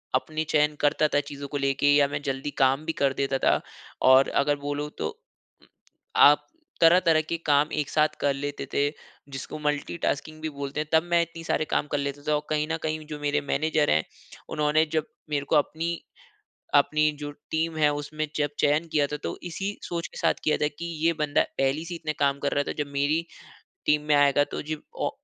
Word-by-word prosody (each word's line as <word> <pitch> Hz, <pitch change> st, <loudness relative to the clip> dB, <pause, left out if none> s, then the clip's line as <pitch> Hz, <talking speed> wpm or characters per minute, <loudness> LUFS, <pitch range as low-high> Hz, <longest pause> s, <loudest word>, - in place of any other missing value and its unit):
अपनी 155 Hz, 0 st, -1 dB
चयन 150 Hz, 0 st, +3 dB
करता 150 Hz, +1 st, +3 dB
था, 145 Hz, -, +4 dB
चीज़ों 140 Hz, 0 st, -6 dB
को 145 Hz, -, -4 dB
लेके 140 Hz, 0 st, +1 dB
या 145 Hz, -1 st, +5 dB
मैं 145 Hz, +1 st, -4 dB
जल्दी 135 Hz, 0 st, -3 dB
काम 135 Hz, +3 st, +3 dB
भी 160 Hz, -, -1 dB
कर 135 Hz, -1 st, +3 dB
देता 135 Hz, 0 st, 0 dB
था, -, -, +2 dB, 0.4 s
और 130 Hz, +1 st, +6 dB
अगर 145 Hz, +1 st, +1 dB
बोलो 145 Hz, +1 st, -3 dB
तो -, -, -4 dB, 0.5 s
उम, -, -, -23 dB, 0.5 s
आप -, -, +6 dB, 0.3 s
तरह-तरह 165 Hz, -1 st, +5 dB
के 160 Hz, +2 st, -3 dB
काम 145 Hz, +1 st, +3 dB
एक 150 Hz, -2 st, -1 dB
साथ 150 Hz, 0 st, +2 dB
कर 140 Hz, -1 st, +2 dB
लेते 140 Hz, 0 st, -4 dB
थे, 145 Hz, 0 st, +2 dB, 0.4 s
जिसको 135 Hz, +2 st, -6 dB
मल्टी 150 Hz, +2 st, -2 dB
टास्किंग 155 Hz, 0 st, -2 dB
भी 160 Hz, -, -2 dB
बोलते 140 Hz, 0 st, -5 dB
हैं, 155 Hz, -, -2 dB
तब 160 Hz, 0 st, +5 dB
मैं 170 Hz, 0 st, +4 dB
इतने 170 Hz, 0 st, -6 dB
सारे 155 Hz, -, 0 dB
काम 150 Hz, -, 0 dB
कर 145 Hz, -, +1 dB
लेता 140 Hz, 0 st, -3 dB
था 150 Hz, -, +3 dB
और 150 Hz, -, 0 dB
कहीं 150 Hz, 0 st, 0 dB
न 160 Hz, -, 0 dB
कहीं 155 Hz, 0 st, -2 dB
जो 150 Hz, -1 st, -6 dB
मेरे 145 Hz, 0 st, 0 dB
मैनेजर 150 Hz, +2 st, +1 dB
हैं, 80 Hz, -, +3 dB, 0.5 s
उन्होंने 150 Hz, +1 st, +2 dB
जब 155 Hz, -1 st, +1 dB, 0.2 s
मेरे 145 Hz, -1 st, -1 dB
को -, -, +3 dB
अपनी 160 Hz, +3 st, +1 dB, 0.8 s
अपनी 150 Hz, +1 st, +4 dB
जो 145 Hz, 0 st, -5 dB, 0.2 s
टीम 160 Hz, 0 st, -1 dB
है, 150 Hz, -1 st, +4 dB
उसमें 155 Hz, +1 st, -4 dB
जब 145 Hz, -1 st, +1 dB
चयन 150 Hz, +3 st, +2 dB
किया 145 Hz, -2 st, +2 dB
था, 150 Hz, -, -4 dB
तो -, -, -5 dB
इसी 195 Hz, +4 st, -4 dB
सोच 170 Hz, -1 st, -3 dB
के -, -, -13 dB
साथ -, -, +2 dB
किया 155 Hz, -, +2 dB
था, 150 Hz, -, +1 dB
कि 150 Hz, +3 st, -7 dB, 0.2 s
ये 170 Hz, -, +4 dB
बंदा 150 Hz, -1 st, +2 dB, 0.2 s
पहली 135 Hz, +4 st, 0 dB
से 175 Hz, -, -6 dB
ही -, -, -4 dB
इतने 155 Hz, -2 st, -3 dB
काम 140 Hz, 0 st, +2 dB
कर 140 Hz, -, -1 dB
रहा 145 Hz, -, +1 dB
था, -, -, -1 dB
जब -, -, -14 dB
मेरी 145 Hz, +4 st, +1 dB, 0.6 s
टीम 150 Hz, 0 st, +4 dB
में 150 Hz, -, +4 dB
आएगा 145 Hz, 0 st, +4 dB
तो -, -, -3 dB
जे 155 Hz, -, -1 dB, 0.2 s
ओ -, -, +1 dB
150 Hz, 215 wpm, -26 LUFS, 145-155 Hz, 0.8 s, और